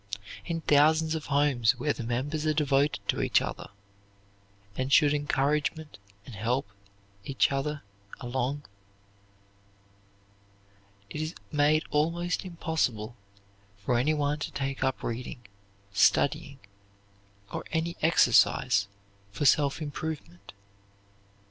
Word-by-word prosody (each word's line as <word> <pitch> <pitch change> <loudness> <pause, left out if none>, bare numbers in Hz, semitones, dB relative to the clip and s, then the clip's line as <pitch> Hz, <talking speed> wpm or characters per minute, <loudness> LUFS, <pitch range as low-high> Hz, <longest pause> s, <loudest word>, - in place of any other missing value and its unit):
In 165 -1 -3
thousands 155 +2 +4
of 160 -2 -4
homes 140 -5 +3
where 145 -1 0
the 120 - -6
members 135 +6 -2
are 155 - +2
devoted 145 -1 +1
to - - 0
each - - +3
other, - - -5 1.1
and 130 +3 -2
should 145 0 +5
encourage 145 0 +1
and 100 -7 -14
help 115 +4 -1 0.6
each 135 +4 +1
other 140 +2 -2 0.4
along, 130 +3 -2 2.5
it 150 - -4
is 155 +2 -4 0.2
made 150 +1 +3
almost 170 +4 0
impossible 160 - -2 0.6
for 100 +5 -1
anyone 145 +3 +1
to - - -4
take 135 0 -3
up 130 - -1
reading, 120 0 -5 0.5
studying, 140 +6 +2 1.0
or - - -3
any 165 +1 -1
exercise 100 -9 +4 0.4
for 125 +9 -3
self 145 +2 +3
improvement. 145 - -6
145 Hz, 105 wpm, -28 LUFS, 125-155 Hz, 2.5 s, should